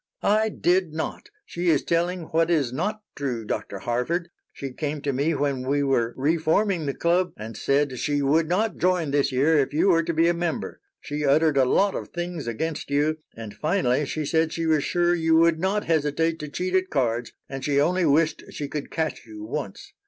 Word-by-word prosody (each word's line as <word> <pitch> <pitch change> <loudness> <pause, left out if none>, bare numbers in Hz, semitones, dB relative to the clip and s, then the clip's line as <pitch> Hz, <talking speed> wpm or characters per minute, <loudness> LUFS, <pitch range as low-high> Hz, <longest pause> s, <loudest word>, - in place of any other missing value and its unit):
"I 215 +2 +3
did 180 -4 +1
not. 160 - -5 0.2
She 175 0 -2
is 150 -4 +3
telling 175 +2 0
what 165 +1 +1
is 145 -8 +1
not 210 +9 -2
true, 125 -6 -3
Dr. 105 -1 -4
Harford. 125 - -2 0.2
She 135 -2 -7
came 150 +2 -3
to 140 -1 -1
me 145 +5 +1
when 140 -2 -1
we 140 +2 0
were 120 -4 +1
re 150 +5 +2
forming 165 0 +1
the 140 - -2
club 175 0 +1
and 110 +1 -7
said 140 -2 0
she 145 -1 0
would 155 +3 +2
not 210 +5 0
join 180 -5 +1
this 140 -1 +2
year 145 +5 +3
if 140 - 0
you 170 +6 +3
were 165 -2 +4
to 165 - -2
be 165 +1 +3
a 175 - +3
member. 170 -1 -3 0.2
She 150 +1 -4
uttered 150 +2 +3
a 130 - +5
lot 195 +10 +2
of - - -5
things 175 -5 -5
against 150 +8 -3
you, 150 +2 +1 0.2
and 110 -2 -8
finally 150 -5 0
she 155 +2 -3
said 160 +2 +1
she 165 - -2
was 155 -3 +2
sure 175 0 +2
you 165 -1 +2
would 165 0 +4
not 195 +4 0
hesitate 160 +1 +1
to 150 - -6
cheat 180 +5 -3
at 185 0 +2
cards, 120 -4 -1 0.2
and 135 -1 -6
she 140 -1 +2
only 175 +4 +2
wished 155 +2 +2
she 145 - -5
could 145 0 -5
catch 160 -6 -3
you 105 -1 -9
once. 110 -2 -6
155 Hz, 210 wpm, -25 LUFS, 140-170 Hz, 0.2 s, a